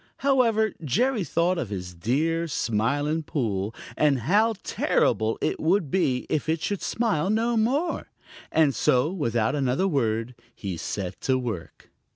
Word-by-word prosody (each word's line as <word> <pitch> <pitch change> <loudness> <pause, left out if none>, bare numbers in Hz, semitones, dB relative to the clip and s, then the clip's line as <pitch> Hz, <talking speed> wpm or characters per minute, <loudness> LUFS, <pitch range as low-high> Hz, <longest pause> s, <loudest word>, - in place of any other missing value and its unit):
However, 230 -6 +3
Jerry 230 - +1
thought 170 +1 +1
of 120 - -3
his 90 -3 -5
dear 155 - 0
Smiling 145 +4 0
Pool, 110 -9 -2 0.2
and 140 -4 +2
how 215 - +3
terrible 110 +1 +1
it - - -1
would 165 -2 +1
be 130 -9 +1
if 155 +1 -1
it 160 0 +1
should 200 +4 -2
smile 205 -8 0
no 230 +3 +1
more, 270 +10 0 0.4
and 155 -4 +3
so 125 +6 +2
without 115 - 0
another 140 +5 +1
word 115 - 0 0.2
he 95 -4 -4
set 90 +2 -5
to 130 -1 +2
work. 115 -9 -6
150 Hz, 145 wpm, -25 LUFS, 115-195 Hz, 0.4 s, However